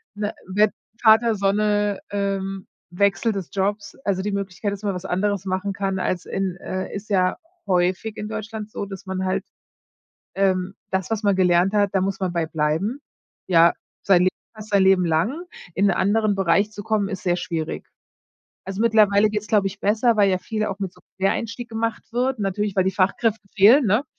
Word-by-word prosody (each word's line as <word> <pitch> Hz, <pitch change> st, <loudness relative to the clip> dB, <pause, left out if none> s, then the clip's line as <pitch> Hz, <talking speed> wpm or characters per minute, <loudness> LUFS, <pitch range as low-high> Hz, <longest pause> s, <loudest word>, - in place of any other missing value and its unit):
we 205 Hz, 0 st, -2 dB, 0.2 s
we 210 Hz, +3 st, +3 dB, 0.3 s
Vater 225 Hz, 0 st, +5 dB
Sonne, 205 Hz, 0 st, +1 dB
ähm, 195 Hz, -1 st, -2 dB, 0.2 s
Wechsel 200 Hz, +4 st, +1 dB
des 195 Hz, -5 st, -5 dB
Jobs. 205 Hz, +2 st, -2 dB
Also, 190 Hz, -2 st, 0 dB
die 205 Hz, -, -2 dB
Möglichkeit 200 Hz, +1 st, -3 dB
ist, 200 Hz, -, -6 dB
dass 210 Hz, -, -3 dB
man 195 Hz, -, -1 dB
was 180 Hz, +1 st, -6 dB
anderes 195 Hz, +1 st, -1 dB
machen 190 Hz, +1 st, -2 dB
kann 195 Hz, -1 st, -2 dB
als 180 Hz, -1 st, -2 dB
in, 190 Hz, -2 st, -3 dB
äh 185 Hz, 0 st, -5 dB
ist 205 Hz, +2 st, -7 dB
ja 185 Hz, -2 st, +2 dB, 0.3 s
häufig 185 Hz, +4 st, 0 dB
in 210 Hz, -, -4 dB
Deutschland 220 Hz, -1 st, -6 dB
so, 200 Hz, -, -4 dB
dass 195 Hz, 0 st, -9 dB
man 190 Hz, 0 st, -3 dB
halt, 185 Hz, -, -1 dB, 0.9 s
ähm 190 Hz, -1 st, +1 dB, 0.2 s
das, 190 Hz, +1 st, -1 dB
was 220 Hz, 0 st, 0 dB
man 200 Hz, -2 st, +3 dB
gelernt 180 Hz, +1 st, +3 dB
hat, 205 Hz, -1 st, +2 dB
da 190 Hz, -, +2 dB
muss 195 Hz, +1 st, -2 dB
man 185 Hz, -2 st, -2 dB
bei 170 Hz, -2 st, 0 dB
bleiben. 160 Hz, -, -1 dB, 0.5 s
Ja, 170 Hz, -2 st, +5 dB, 0.3 s
sein 180 Hz, -3 st, +4 dB
Le 185 Hz, -, +4 dB, 0.3 s
fast 215 Hz, 0 st, -10 dB
sein 200 Hz, -1 st, +4 dB
Leben 190 Hz, -2 st, +4 dB
lang. 180 Hz, -, 0 dB, 0.3 s
In 200 Hz, +1 st, +3 dB
'n 190 Hz, -, +3 dB
anderen 205 Hz, +2 st, +2 dB
Bereich 195 Hz, +3 st, +2 dB
zu 205 Hz, -1 st, -8 dB
kommen, 215 Hz, -2 st, 0 dB
ist 190 Hz, -3 st, -5 dB
sehr 175 Hz, -1 st, +2 dB
schwierig. 165 Hz, -3 st, -4 dB, 0.8 s
Also, 195 Hz, +2 st, -5 dB
mittlerweile 215 Hz, -2 st, +4 dB
geht's, 210 Hz, 0 st, -3 dB
glaube 205 Hz, -2 st, +2 dB
ich, 200 Hz, -, -11 dB
besser, 220 Hz, +3 st, +2 dB
weil 205 Hz, -1 st, +4 dB
ja 185 Hz, -, +1 dB
viel 215 Hz, +3 st, -3 dB
auch 200 Hz, -2 st, -4 dB
mit 190 Hz, -2 st, -3 dB
so -, -, -21 dB, 0.2 s
Quereinstieg 230 Hz, +5 st, -1 dB
gemacht 225 Hz, 0 st, -2 dB
wird. 250 Hz, +1 st, 0 dB
Natürlich, 205 Hz, 0 st, -1 dB
weil 190 Hz, -, +4 dB
die 190 Hz, -, +2 dB
Fachkräfte 205 Hz, +3 st, 0 dB
fehlen, 225 Hz, +7 st, +6 dB
ne? 215 Hz, +8 st, +2 dB
200 Hz, 195 wpm, -23 LUFS, 185-210 Hz, 0.9 s, fehlen